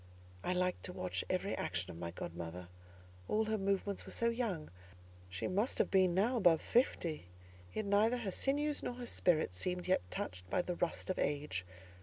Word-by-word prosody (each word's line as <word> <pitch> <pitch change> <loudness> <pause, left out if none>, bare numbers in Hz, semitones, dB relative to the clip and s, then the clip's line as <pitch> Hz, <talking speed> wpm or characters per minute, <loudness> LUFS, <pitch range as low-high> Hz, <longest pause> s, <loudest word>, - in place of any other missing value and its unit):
I 180 - +1
liked 180 0 0
to 180 - -4
watch 90 - -2
every 185 +2 0
action 90 +2 -2
of 85 - -9
my 85 -1 -3
godmother; 85 +1 -6 0.6
all 220 +1 +2
her 220 0 0
movements 195 0 0
were - - -9
so 235 - +2
young: 225 - -2 0.6
she 90 0 -3
must 205 +7 +1
have - - +2
been 185 -2 +4
now 230 +7 +3
above 175 -7 +5
fifty, 170 - +1 0.4
yet 215 - -2
neither 210 +4 +4
her 220 -5 -3
sinews 290 +6 +1
nor 245 - -3
her 245 0 -6
spirit 160 - +2
seemed 180 - -2
yet 185 - +4
touched 90 0 -5
by 180 - +2
the 180 - -2
rust 175 +2 0
of - - -3
age. 145 -12 -1
180 Hz, 185 wpm, -36 LUFS, -, 0.6 s, above